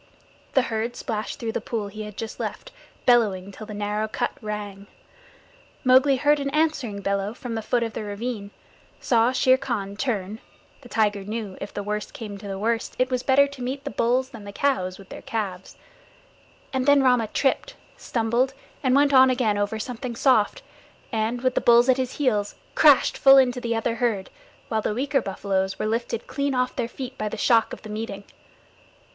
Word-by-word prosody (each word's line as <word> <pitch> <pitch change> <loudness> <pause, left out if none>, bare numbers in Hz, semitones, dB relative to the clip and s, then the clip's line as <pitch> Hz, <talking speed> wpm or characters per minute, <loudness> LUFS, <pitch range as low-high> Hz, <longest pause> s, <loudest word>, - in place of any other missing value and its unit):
The 265 - +5
herd 230 0 -2
splashed 215 -1 -4
through 230 -1 -3
the - - -3
pool 220 -3 -3
he 215 +2 -8
had 210 -1 -8
just 225 - -6
left, - - -5 0.3
bellowing 200 -6 +3
till 215 +2 -10
the 215 - -7
narrow 210 +1 -1
cut - - -2
rang. 205 -2 -6 1.0
Mowgli 260 +1 +5
heard 295 +3 +3
an 280 0 -2
answering 280 -9 0
bellow 200 +2 -1
from 245 -2 -6
the 225 - -2
foot 240 +2 0
of 225 -1 -4
the - - -4
ravine, 205 0 -4 0.5
saw 235 0 +3
Shere 260 0 +4
Khan 210 -7 -3
turn 210 -3 -2 0.4
(the 245 - -14
tiger 210 -3 +1
knew 210 -1 -5
if 200 - -5
the 205 - -5
worst 210 +1 -4
came 205 -3 -7
to 200 - -9
the 195 -1 -4
worst 225 +3 -1
it 255 +1 +1
was 250 -1 0
better 270 +2 +5
to 280 -2 -10
meet 265 +3 -3
the 285 - -4
bulls 250 +3 +1
than 230 -5 -11
the 200 - -8
cows 200 -8 0
with 195 -2 -15
their - - -9
calves), 195 -5 -4 1.0
and 260 0 -1
then 285 -1 +6
Rama 250 -4 +3
tripped, 285 - 0 0.2
stumbled, 240 +3 0 0.3
and 260 -2 +2
went 285 0 +4
on 260 0 +8
again 235 -5 +1
over 205 +2 -1
something 240 +2 -5
soft, 235 -4 +2 0.5
and, 225 +1 -1
with 255 -1 +2
the - - +1
bulls 240 +2 +5
at 260 - +5
his 260 -1 -2
heels, 215 -8 0 0.2
crashed 295 -4 +5
full 270 0 +8
into 250 -2 +3
the 235 -1 -1
other 230 +1 -1
herd, 220 -5 -1 0.4
while 220 -1 0
the 210 - -2
weaker 275 +2 +1
buffaloes 195 -1 -2
were - - -2
lifted 230 +1 -2
clean 280 -1 -2
off 250 0 0
their 240 -3 -1
feet 260 +1 -7
by 215 - -1
the 225 - -6
shock 225 +1 +3
of - - -8
the 215 - -9
meeting. 210 -2 -5
230 Hz, 195 wpm, -24 LUFS, 210-255 Hz, 1.0 s, on